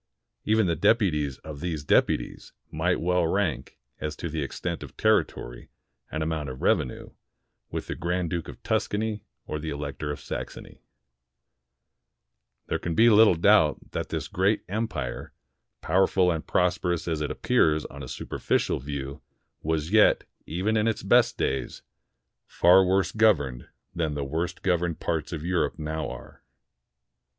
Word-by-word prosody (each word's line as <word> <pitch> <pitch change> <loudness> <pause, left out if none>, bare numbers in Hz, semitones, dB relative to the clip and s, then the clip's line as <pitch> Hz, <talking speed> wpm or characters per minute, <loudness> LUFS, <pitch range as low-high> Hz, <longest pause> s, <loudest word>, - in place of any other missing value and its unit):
Even 110 0 +3
the 85 -2 +1
deputies 75 - +2
of 75 -2 -8
these 80 -3 -3
deputies - - +1 0.2
might 90 +4 0
well 90 -1 +1
rank, 95 -2 -1 0.2
as 75 0 -4
to 80 -1 -5
extent 85 +4 -4
of - - -10
territory - - 0 0.4
and 80 0 -2
amount 80 -3 -2
of 65 - -8
rev - - +5
enue, 65 - -7 0.6
with - - -4
the - - -4
Grand 85 0 -2
Duke 85 -2 -3
of - - -11
Tuscany 105 0 -1 0.2
or 75 - -4
the 80 +1 -5
Elector 75 0 -4
of 75 - -4
Saxony. - - -7 1.8
There - - -2
can 85 -2 -3
be 115 +5 +6
little 105 -3 +7
doubt 85 -3 +3
that - - -4
this - - -3
great 95 +4 +1
empire, 100 - -4 0.5
powerful 95 +1 +3
and 80 -2 -4
prosperous 90 -1 0
as 80 -2 -1
it 75 - -1
appears 75 0 +2
on - - -9
a - - -7
superficial - - -1
view, 70 +1 -6 0.4
was 80 +1 -1
yet, 110 0 +5 0.2
even 95 +7 0
in 110 +1 +2
its 110 - -1
best - - +4
days, 65 0 -2 0.6
far 90 +2 +5
worse 95 +1 +2
governed 75 - +2 0.3
than 80 -3 -1
the 70 - -2
worst 85 +5 -3
governed 85 -3 0
parts 80 -3 -2
of 80 -2 -5
Europe 90 -1 0
now 80 0 -3
are. - - -10
85 Hz, 150 wpm, -26 LUFS, 75-95 Hz, 1.8 s, little